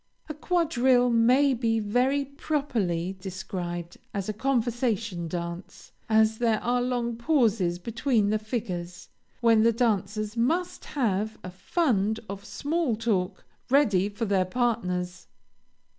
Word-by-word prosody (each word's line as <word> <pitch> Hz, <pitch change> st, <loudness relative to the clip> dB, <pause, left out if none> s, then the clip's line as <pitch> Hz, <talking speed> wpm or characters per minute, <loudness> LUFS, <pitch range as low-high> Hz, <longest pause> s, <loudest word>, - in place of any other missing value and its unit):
A 305 Hz, -, -4 dB
quadrille 265 Hz, -7 st, +2 dB
may 250 Hz, +5 st, +4 dB
be 225 Hz, -2 st, +1 dB
very 250 Hz, +7 st, +1 dB
properly 230 Hz, -, -2 dB
described 180 Hz, -3 st, -5 dB, 0.2 s
as 195 Hz, -2 st, -2 dB
a 215 Hz, -, -2 dB
conversation 230 Hz, -6 st, -1 dB
dance, 170 Hz, +2 st, -6 dB, 0.2 s
as 220 Hz, 0 st, +3 dB
there 225 Hz, -3 st, +2 dB
are 245 Hz, +1 st, +1 dB
long 245 Hz, -1 st, -1 dB
pauses 230 Hz, -, +2 dB
between 225 Hz, +1 st, 0 dB
the 215 Hz, -, +1 dB
figures, 190 Hz, -6 st, -5 dB, 0.3 s
when 230 Hz, -2 st, +5 dB
the 230 Hz, +1 st, +5 dB
dancers 215 Hz, -2 st, -1 dB
must 325 Hz, +10 st, 0 dB
have 220 Hz, -4 st, 0 dB
a 185 Hz, -, -6 dB
fund 220 Hz, -, 0 dB
of 200 Hz, 0 st, -7 dB
small 295 Hz, 0 st, -1 dB
talk 205 Hz, -4 st, -1 dB, 0.2 s
ready 210 Hz, -9 st, +3 dB
for 210 Hz, +3 st, -3 dB
their 195 Hz, -3 st, +2 dB
partners. 185 Hz, -5 st, -2 dB
225 Hz, 125 wpm, -27 LUFS, 190-245 Hz, 0.3 s, when